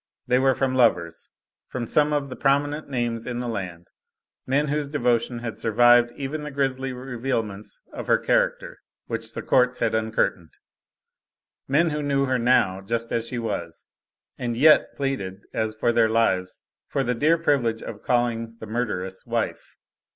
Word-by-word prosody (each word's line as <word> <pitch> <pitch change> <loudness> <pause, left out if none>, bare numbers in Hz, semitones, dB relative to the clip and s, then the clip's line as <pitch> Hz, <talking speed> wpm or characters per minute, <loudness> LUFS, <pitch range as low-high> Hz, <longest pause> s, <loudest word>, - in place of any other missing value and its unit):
They 125 +1 +3
were 135 0 +3
from 135 0 0
lovers; 90 -10 +1 0.4
from 125 -2 -4
some 150 +5 +2
of 145 -2 -1
the 130 - -6
prominent 145 +2 0
names 120 -3 -2
in 120 -1 -3
the 125 - -3
land; 90 -6 -5 0.6
men 140 +3 +1
whose 145 -1 -1
devotion 120 -4 0
had 115 -1 -6
survived 120 +2 +5
even 145 +2 -4
the 150 - -5
grisly 135 -2 -1
revealments 120 -5 -4 0.2
of - - -6
her - - +5
character - - 0 0.3
which - - -4
the - - -4
courts 125 0 +3
had 115 - 0
uncurtained; 110 -6 -1 1.1
men 155 +5 +3
who 150 0 -2
knew 140 -1 +1
her 130 -1 0
now, 105 -6 +2
just 115 +3 -3
as 115 0 -1
she 125 - -4
was, 85 -8 -4 0.5
and 120 -2 -2
yet 155 +4 +5
pleaded 100 -9 -3
as 110 0 -1
for 120 +2 +1
their 115 -1 +3
lives 95 -5 0 0.2
for 135 - -1
the 125 -1 0
dear 155 +7 +3
privilege 125 -8 +1
of - - -8
calling 115 -2 0
the - - -7
murderess 105 -5 -3
wife. - - -3
120 Hz, 165 wpm, -24 LUFS, 115-135 Hz, 1.1 s, survived